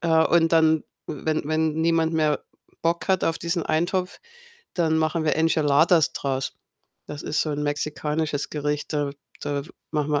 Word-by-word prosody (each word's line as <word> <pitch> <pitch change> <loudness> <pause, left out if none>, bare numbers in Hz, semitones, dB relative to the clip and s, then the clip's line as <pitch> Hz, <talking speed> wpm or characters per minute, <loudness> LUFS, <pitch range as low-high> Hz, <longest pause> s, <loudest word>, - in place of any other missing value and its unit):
äh, 170 - -1 0.2
und 165 -1 +3
dann, 160 -1 +4 0.2
wenn 155 +2 -2
wenn 155 0 +1
niemand 165 0 +2
mehr 155 -2 +1 0.4
Bock 170 +3 0
hat 190 -1 +2
auf 165 - 0
diesen 170 0 -1
Eintopf, 180 +3 0 0.6
dann 160 -3 +2
machen 160 +1 0
wir 155 - +2
Enchiladas 160 0 +4
draus. 135 -1 -2 0.5
Das 145 -1 -7
ist 155 - 0
so 155 - -2
'n 150 0 -2
mexikanisches 150 0 -2
Gericht. 150 0 -2
Da 145 -2 0 0.3
da 145 -1 -2 0.3
machen 150 -1 -1
wir 145 - +2
155 Hz, 160 wpm, -24 LUFS, 150-165 Hz, 0.6 s, dann